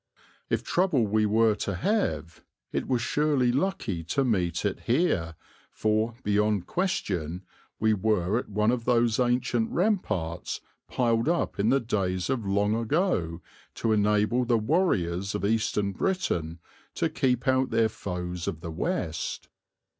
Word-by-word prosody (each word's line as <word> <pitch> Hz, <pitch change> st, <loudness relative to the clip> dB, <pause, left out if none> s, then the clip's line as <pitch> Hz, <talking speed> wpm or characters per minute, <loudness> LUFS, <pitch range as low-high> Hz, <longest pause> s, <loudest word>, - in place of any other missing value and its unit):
If -, -, 0 dB
trouble 170 Hz, -, +2 dB
we 105 Hz, +1 st, +2 dB
were 110 Hz, +1 st, +4 dB
to 100 Hz, -, -2 dB
have 85 Hz, -, -1 dB, 0.3 s
it -, -, -2 dB
was 125 Hz, -2 st, 0 dB
surely 140 Hz, -2 st, +2 dB
lucky 125 Hz, -, -1 dB
to 135 Hz, -, 0 dB
meet 90 Hz, -6 st, 0 dB
it 100 Hz, -, -1 dB
here 115 Hz, -, +1 dB, 0.3 s
for, 110 Hz, +2 st, 0 dB
beyond 105 Hz, -2 st, +1 dB
question, 90 Hz, -, -2 dB, 0.4 s
we 110 Hz, 0 st, +3 dB
were 105 Hz, 0 st, +1 dB
at -, -, -8 dB
one 105 Hz, +2 st, +2 dB
of 120 Hz, -2 st, -2 dB
those 120 Hz, -2 st, +2 dB
ancient 120 Hz, -2 st, +1 dB
ramparts 110 Hz, -, -1 dB, 0.3 s
piled 115 Hz, +2 st, +1 dB
up 170 Hz, -10 st, -1 dB
in 105 Hz, +3 st, +3 dB
the 135 Hz, +2 st, +4 dB
days 95 Hz, -4 st, -1 dB
of 115 Hz, -6 st, -2 dB
long 100 Hz, +2 st, +2 dB
ago 115 Hz, -, 0 dB, 0.3 s
to 115 Hz, -, 0 dB
enable 105 Hz, +3 st, +2 dB
the 120 Hz, -1 st, +2 dB
warriors 105 Hz, -, 0 dB
of 95 Hz, -, -2 dB
Eastern 105 Hz, -2 st, +1 dB
Britain 90 Hz, -, -1 dB, 0.4 s
to -, -, +1 dB
keep 125 Hz, -1 st, 0 dB
out 130 Hz, 0 st, +3 dB
their 115 Hz, -1 st, +3 dB
foes 90 Hz, -4 st, -5 dB
of 80 Hz, -, -3 dB
the 85 Hz, -, -5 dB
West. 80 Hz, 0 st, -3 dB
110 Hz, 145 wpm, -27 LUFS, 95-125 Hz, 0.4 s, were